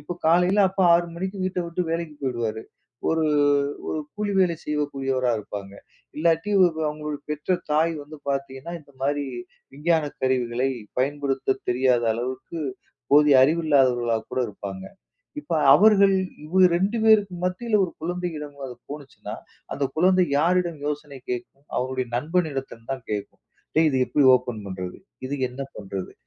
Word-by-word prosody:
இப்போ 175 - -6
காலையில 180 +5 +4
அப்பா 190 0 +1
6 170 0 +2
மணிக்கு 190 +2 -4
வீட்டை 185 -1 -1
விட்டு 170 +2 -2
வேலைக்கு 165 -2 -3
போயிடுவாரு, 115 -4 -2 0.5
ஒரு 160 0 +1 0.6
ஒரு 155 - -2
கூலி 210 -1 -2
வேலை 175 -3 +2
செய்யக்கூடியவராக 135 -5 -1
இருப்பாங்க. 100 -1 -8 0.4
இல்லாட்டி 165 +4 +1 0.4
அவங்களோட 150 0 -4
பெற்ற 150 +5 0 0.2
தாய் 160 +2 +3
வந்து 150 +2 -11
பார்த்தீங்கன்னா 135 +3 -4
இந்த 145 - -21
மாதிரி 145 +1 0 0.5
விஞ்ஞானக் 155 0 0
கருவிகளை 130 0 +1 0.3
பயன்படுத்த 135 0 0
தெரியாத 125 -1 +2
அளவுக்கு 130 +7 -5 0.5
போதிய 145 -1 +7
அறிவு 165 +4 +1
இல்லாதவர்களா 125 -5 +3
கூட - - -1
இருப்பாங்க. 100 -2 -7 0.6
இப்போ 175 - -3 0.2
அவர்கள் 200 +2 +6 0.3
இவங்க 185 +4 +5
2 195 +6 0
பேருக்கு 210 -4 +5
மத்தியில் 210 +5 0
ஒரு 180 - -5
குழந்தையிடம் 160 -4 -4 0.3
போனுச்சின்னா, 145 -2 -8 0.4
அந்த 140 - -1
குழந்தை 185 +2 +4
யாரிடம் 175 0 +1
யோசனை 150 -2 -4
கேட்கும்? 125 +3 -6
அவர்களுடைய 130 0 -1
நண்பனிடத்தில் 140 -5 -2
தான் 130 -2 -5
கேட்கும். 105 -1 -5 0.3
டேய் 160 0 +5
இது 135 - +1
எப்படி 145 -2 +3
ஓப்பன் 125 -4 -6
பண்றது? 90 -1 -6 0.3
இது 140 +2 -3
என்ன 125 +2 -9 0.2
பண்றது? 95 -2 -6
150 Hz, 135 wpm, -24 LUFS, 130-170 Hz, 0.6 s, போதிய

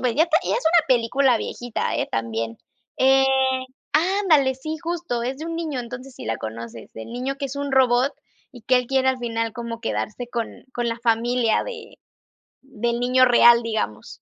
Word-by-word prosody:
pues 245 -3 0
ya 320 +4 +4
te 325 -1 +3
y - - -3
es - - +2
una 330 -7 +3
película 250 +1 +3
viejita, 240 +1 -3
¿eh?, - - -1
también. 115 0 -3 0.4
Eh, 270 +1 +5 0.7
ándale, 320 -5 +3
sí, 310 +5 -5
justo, 335 -8 -3
es 260 +3 -3
de 315 - -6
un 330 0 -4
niño, 310 -6 -3
entonces, 255 +2 -9
si - - -9
la 115 0 -2
conoces, 115 0 -8
del 110 - -9
niño 255 +3 -3
que 275 0 -3
es 275 +1 -7
un 285 -1 -3
robot 260 0 +3 0.4
y 245 - -13
que 255 +3 +3
él 250 -1 0
quiere 265 +1 +2
al 260 -1 +1
final 230 -2 -2
como 235 -1 -6
quedarse 235 0 -3
con 235 -2 -5
con 240 -1 -1
la 230 0 -3
familia 235 0 +2
de 460 -3 -9 0.7
del 235 -3 -3
niño 255 +1 +4
real, 240 -1 +6
digamos. 220 - -4
250 Hz, 190 wpm, -23 LUFS, 230-275 Hz, 0.7 s, real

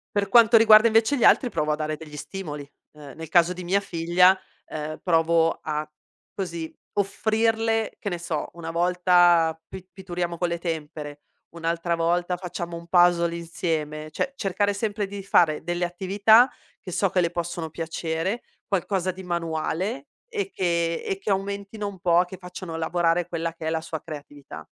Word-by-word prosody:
Per 200 -1 +1
quanto 230 +2 +7
riguarda, 220 0 +7
invece, 225 +4 +3
gli 250 - -1
altri 250 - +5
provo 150 -6 -1
a - - +2
dare 155 0 -2
degli 150 -1 -11
stimoli, 150 -5 -7 0.3
ehm, 145 -3 -11
nel 160 -1 -8
caso 175 +1 +4
di 180 0 -8
mia 185 +3 +2
figlia, 180 0 +3 0.3
ehm, 155 0 -6
provo 165 -1 +3
a, 150 0 -3 0.5
così, 170 -4 -5 0.3
offrirle 225 +2 0
che 205 - -4
ne 175 - -3
so, 165 -3 -4
una 165 -1 -6
volta 175 -1 +4
pi 185 -1 -10
pitturiamo 175 -2 -4
con 175 0 0
le 170 0 -3
tempere, 150 -3 -5 0.3
un'altra 170 +1 -1
volta 175 +2 0
facciamo 175 -1 -6
un 170 0 -9
puzzle 175 -1 +4
insieme. 155 -2 -3
Cioè, 270 - -2
cercare 205 -2 0
sempre 205 0 -2
di 200 0 -7
fare 160 -5 +3
delle 175 +1 -1
attività 200 +7 +4 0.3
che 185 - -8
so 195 +2 +1
che 185 0 +2
le 170 - +1
possono 170 -1 -4
piacere, 165 +5 -3 0.3
qualcosa 190 -1 0
di 190 +1 -10
manuale 175 - -2 0.2
e 425 -5 -3
che 170 -2 0
e 195 - -2
che 210 - -5
aumentino 200 +2 -2
un 195 -3 -8
po' 175 0 +4
che 185 +1 -9
facciano 180 -2 -8
lavorare 165 +1 0
quella 165 -1 -3
che 160 -1 -6
è - - +1
la 160 0 0
sua 160 -1 -6
creatività. 145 - -10
175 Hz, 170 wpm, -25 LUFS, 165-195 Hz, 0.5 s, quanto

